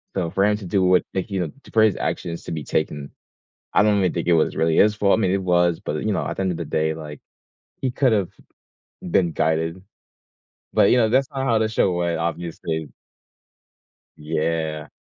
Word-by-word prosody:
So 85 -4 -1
for 100 +1 +2
him 105 0 +3
to 100 - -9
do 95 +1 +1
what 90 0 +4
like, 95 +2 -3
you 95 -2 -1
know, 80 - -3
to - - -16
put 110 -1 +5
his 105 - +1
actions 85 -1 -3
to - - -6
be 75 -2 -4
taken, 75 -1 -2 0.6
I - - +5
don't 105 -1 +3
really 90 - +2
think 85 - -3
it 85 - +4
was 80 - +2
really 80 0 +1
his 105 0 +5
fault. 105 0 +3
I - - 0
mean, 95 -2 +2
it 100 0 0
was. 85 -2 +2
But, 75 +1 -4
you 110 - 0
know, - - -1
at - - -4
the - - -1
end 95 - 0
of 85 - -4
the - - -4
day, 80 0 0
like, 75 -2 -9 0.6
he 130 - 0
could 130 -1 +2
have 100 -5 +1 0.7
been 90 -1 +1
guided. 80 +3 -1 0.9
But, - - +4
you - - +5
know, 110 -2 +3
that's 130 +3 +2
not 135 - -2
how 115 -4 +2
to 110 0 +1
show 110 -3 +1
went, 85 -2 -1
obviously. 80 -2 -4 1.3
Yeah. 75 0 -2
90 Hz, 220 wpm, -22 LUFS, 80-105 Hz, 1.3 s, put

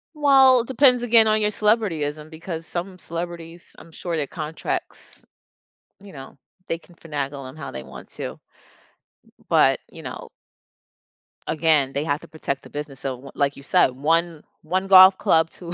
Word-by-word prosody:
Well, 270 -3 +6
it 230 - -9
depends 255 -1 +4
again 230 -2 +5
on 215 0 +2
your 210 - +2
celebrityism 165 -9 -1
because 165 0 -7
some 185 +1 -5
celebrities 170 0 -7
I'm 165 - -15
sure 170 +1 -5
their 150 -3 -2
contracts, 155 -1 -6 0.7
you 200 0 -14
know, 135 -4 -12 0.3
they 165 - -3
can 175 +1 -21
finagle 140 -4 -5
them 130 - -11
how 155 - -7
they 65 - -7
want 65 -1 -12
to, - - -6
b - - -33 0.9
but, - - +3
you - - -12
know - - -8 1.2
again, 155 -4 +2
they 140 - -1
have 145 -1 -1
to - - -13
protect 140 -3 -5
the - - -13
business, 145 -2 -7
so, 135 -1 -3
w 135 +3 -13
like 140 -1 0
you 140 - -12
said, 140 - +3
one 160 +4 0 0.2
one 185 +4 -2
golf 190 0 +8
club 160 0 +2
to 175 0 -8
165 Hz, 170 wpm, -23 LUFS, 145-190 Hz, 1.2 s, golf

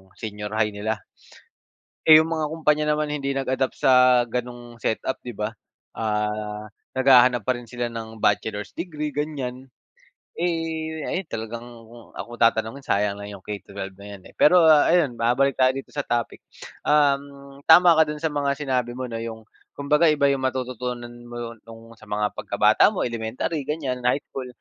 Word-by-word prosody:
senior 105 -1 -6
high 110 -1 +1
nila. 105 +2 -3 1.0
Eh, 155 -1 +9
yung 160 - +1
mga 160 -2 -1
kumpanya 150 -1 +1
naman 150 0 -1
hindi 140 -2 -2
nag-adapt 130 -1 -1
sa 125 -1 +5
ganong 120 0 -6
setup, 115 +3 -2
'di 120 - -6
ba. 105 +2 -4 0.4
Ah, 105 -1 -2 0.3
naghahanap 130 -2 +5
pa 130 - +2
rin 120 - -10
sila 120 0 -4
ng 110 -1 -8
bachelor's 105 0 -1
degree, 155 -3 -4
ganyan. 135 -4 -4 0.7
Eh, 160 -2 -2
ayan, 185 -2 -3
talagang 115 +1 -5 0.2
kung 115 +1 -16
ako 120 - -7
tatanungin, 115 +3 +2
sayang 100 0 0
lang 100 0 -7
'yong 95 - -15
K-12 100 -2 -7
na 100 - -11
'yan, 95 - -15
eh. - - -31
Pero 175 +3 +6
ayun, 155 -2 +5
babalik 125 +4 +2
tayo 130 0 +4
dito 135 - -7
sa 145 -1 -4
topic. 120 -1 -2 0.5
Um, 140 -1 +1
tama 175 +1 +8
ka 160 - +5
do'n 150 0 -4
sa 160 - +1
mga 140 -1 0
sinabi 125 -4 -2
mo 130 0 -4
na 115 - -4
'yong 110 -1 -7 0.3
kumbaga 150 +4 +2
iba 150 -2 +3
'yong 135 - -1
matututunan 125 -2 -3 0.2
mo 120 -1 -7
no'ng 115 0 -13
sa 110 - -16
mga 105 0 0
pagkabata - - +3
mo, - - 0
elementary 120 +6 -3
ganyan, 140 -5 -2
high 135 +3 +1
school, 130 -1 -7
125 Hz, 165 wpm, -24 LUFS, 110-145 Hz, 1.0 s, Eh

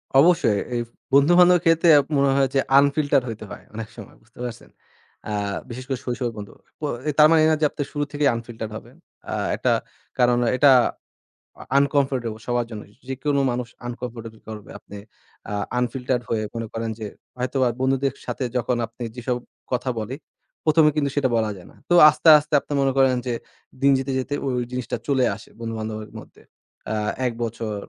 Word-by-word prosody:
অবশ্যই। 135 - +5 0.2
এই 120 - 0
ফ - - -29 0.2
বন্ধুবান্ধবের 175 +5 +6
ক্ষেত্রে 165 +1 +4 0.3
মনে 140 0 +3
হয় 135 -1 +3
যে, - - +4 0.2
আনফিল্টার্ড‌ 140 -1 +2
হইতে 110 -1 -7
হয় 100 - -9
অনেক 110 -1 -5
সময়। - - -11
বুঝতে - - -23
পারছেন? 120 -2 -7 0.6
আ - - -2 0.4
বিশেষ 125 +2 -7
করে 135 -2 -2
শৈশবের 120 -1 -2
বন্ধু। 100 -1 -8 0.3
প - - -46 0.4
তার 150 0 +8
মানে 165 - +5
এই - - +5
না - - +4
যে, - - +4
আপনি 145 - -3
শুরু 145 - -1
থেকেই 145 -1 +2
আনফিল্টার 115 -1 -6
হবেন। - - -10 0.4
আ - - -2 0.2
একটা - - +1 0.5
কারণ, 120 -1 +4 0.2
এটা 140 +1 +6 0.9
আ - - -8
আনকমফর্টেবল 135 -5 +1
সবার 120 -1 0
জন্যই। 105 -2 -9 0.2
যেকোনো 140 +2 0
মানুষ 120 0 -3 0.2
আনকমফর্টেবল 120 -1 -6
ফিল 110 - -21
করবে, 105 -2 -9
আপনি 105 - -11 0.5
আ - - -3 0.3
আনফিল্টার 125 +1 -1
হয়ে 110 -2 0
মনে 115 -1 -3
করেন 115 0 -3
যে, 110 - -4 0.3
হয়তোবা 130 +1 0
বন্ধুদের 135 0 +1
সাথে 120 +2 -3
যখন 125 0 0
আপনি 115 +2 -9
যেইসব 125 0 -2 0.3
কথা 130 +1 -1
বলি, 110 +4 -4 0.5
১ম 155 0 +5
এ - - 0
কিন্তু 140 -2 +1
সেইটা 140 -3 +2
বলা 110 -1 +1
যায় 90 - -13
না। - - -21
তো - - +3 0.2
আস্তে, 155 +2 +3
আস্তে 150 +1 -11
আপনি - - -6
মনে 135 0 +2
করেন 135 -1 +4
যে 120 - 0 0.5
দিন 140 0 +5
যেতে, 135 +1 -3
যেতে 130 +2 -4
ওই, 135 - -1
ওই - - -1
জিনিসটা 125 -2 -3
চলে 135 -3 +3
আসে 110 - -14
বন্ধুবান্ধবের 110 -2 -5
মধ্যে। - - -16 0.5
অ্যা 105 -1 -1 0.2
১ 125 - 0
বছর, 115 -2 -4
125 Hz, 185 wpm, -23 LUFS, 115-140 Hz, 0.9 s, তার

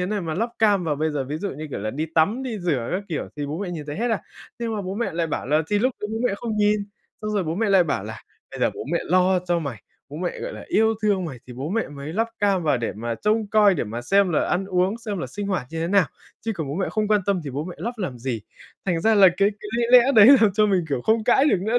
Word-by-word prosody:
thế 180 - 0
này 210 0 -2
mà 160 -2 -3
lắp 230 +5 -1
cam 205 -5 +3
vào, 150 -3 -1
bây 155 +1 0
giờ 140 -3 -2
ví 145 +3 -4
dụ 200 +5 -3
như, 155 +3 -7
kiểu - - -4
là, 110 +2 -3
đi 155 +6 -3
tắm 205 +11 +2
đi 235 -5 -4
rửa 150 -10 -1
các 190 - -1
kiểu 160 - -3
thì 145 -1 -3
bố 150 +3 -4
mẹ 195 -2 -4
nhìn 155 -4 -6
thấy 145 - -5
hết 235 +2 -1
à?" 220 - +1 0.4
Nhưng 230 -2 -2
mà 205 - -3
bố 185 +1 -4
mẹ 235 -3 -2
lại 165 0 -1
bảo 155 - -3
là 155 +3 +2
"Thì 205 - +3
lúc 255 +4 +1
đấy 210 - -3
bố 225 - -2
mẹ 195 - 0
không 225 -1 -4
nhìn" 210 0 +2 0.4
xong 215 - -2
rồi 200 -3 0
bố 160 +1 -2
mẹ 215 +2 0
lại 190 -3 +5
bảo 120 -10 -2
là 110 0 -8 0.3
"bây - - -8
giờ - - +3
bố - - -6
mẹ 170 - +2
lo 185 +1 +3
cho 175 -1 -1
mày, 140 -10 -6 0.3
bố 145 - -8
mẹ, 175 +2 -3
gọi - - -5
là, - - -9
yêu 220 +1 +3
thương 200 -4 +1
mày 135 -7 -6
thì 125 - -9
bố 135 +5 -5
mẹ 225 +4 -1
mới 145 +2 -7
lắp 225 +4 0
cam 195 -3 +2
vào 150 -4 +2
để 120 - -2
mà 115 +2 -4
trông 215 - 0
coi, 205 -2 +4
để 140 - -1
mà 115 +3 -5
xem 195 +9 +3
là - - +1
ăn 180 +2 0
uống, 190 +3 0
xem 210 -4 -4
là - - -3
sinh 205 -1 -5
hoạt 185 -10 -2
như 165 - -4
thế 165 - -1
nào, 195 -4 +4 0.3
chứ 225 - -2
còn 160 -6 -4
bố 140 - -3
mẹ 190 - -1
không 215 -1 -1
quan 210 -1 +3
tâm 195 -3 +1
thì 140 - -4
bố 140 +4 -3
mẹ 180 0 -7
lắp 225 +9 -3
làm 170 - -4
gì?" 120 -3 -3 0.4
Thành 175 -4 0
ra 220 +5 +3
là 200 -2 +8
cái 200 +1 +4
cái 210 - -7
lý 240 - +1 0.2
lẽ 260 +3 +3
đấy 215 -1 +9
làm 215 -3 +4
cho 210 +2 +3
mình, 190 -4 +1
kiểu, 135 -4 -1
không 220 0 +2
cãi 265 +4 +4
được 290 - +3
nữa 225 +5 +1
185 Hz, 315 wpm, -23 LUFS, 155-210 Hz, 0.4 s, đấy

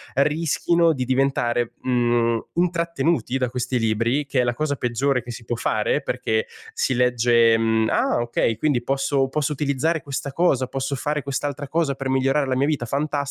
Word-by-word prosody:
rischino 165 +4 +2
di 130 -3 -3
diventare, 125 -2 0
mhmm, 120 -2 +1 0.2
intrattenuti 170 -6 0
da 125 -2 -1
questi 125 0 -2
libri, 115 +5 0
che 135 -1 -1
è - - +1
la 120 0 -1
cosa 155 +2 -1
peggiore 125 +1 0
che 120 - -13
si 115 0 -9
può 120 - -2
fare, 115 - 0
perché 110 0 -1 0.3
si 130 - 0
legge, 120 -2 +4
mhmm: 110 0 +1
“Ah, - - +1
ok, 120 -1 0
quindi 140 -1 +1
posso 135 +1 0
posso 150 +2 -1
utilizzare 150 +3 0
questa 140 0 -5
cosa, 135 -4 +2
posso 135 +2 -3
fare 150 +3 -2
quest'altra 140 +1 -4
cosa 155 0 0
per 135 0 -5
migliorare 135 +2 +1
la 130 - 0
mia 135 +2 +2
vita, 150 -5 -1
fantastico.” 145 +4 -2
135 Hz, 175 wpm, -22 LUFS, 120-145 Hz, 0.3 s, legge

